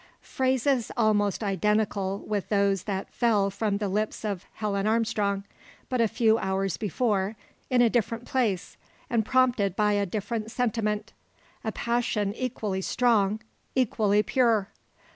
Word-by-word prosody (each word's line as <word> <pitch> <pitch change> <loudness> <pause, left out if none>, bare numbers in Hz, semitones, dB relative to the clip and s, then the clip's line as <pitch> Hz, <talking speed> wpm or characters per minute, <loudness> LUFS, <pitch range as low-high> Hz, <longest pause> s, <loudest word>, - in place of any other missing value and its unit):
Phrases 260 -1 0
almost 210 -2 +2
identical 200 0 0
with 205 -2 -2
those 200 -3 +2
that 195 -2 -4
fell 210 -5 +2
from 205 0 -1
the 205 0 -2
lips 210 +3 -2
of 200 -4 -3
Helen 205 -1 -1
Armstrong, 215 -3 +1 0.5
but 255 -2 +1
a 230 - +4
few 220 0 +2
hours 190 -2 -1
before, 210 0 0 0.3
in 250 -1 +4
a 235 - +5
different 235 0 -1
place, 215 -8 -1 0.3
and 230 -2 +2
prompted 245 -6 +2
by 210 0 +2
a 200 -1 +1
different 215 +3 -3
sentiment 220 -3 -1 0.5
a - - -1
passion 235 -4 -1
equally 215 -5 -3
strong, 215 -2 +2 0.3
equally 210 -5 +2
pure! 230 -6 +2
215 Hz, 135 wpm, -27 LUFS, 200-235 Hz, 0.5 s, a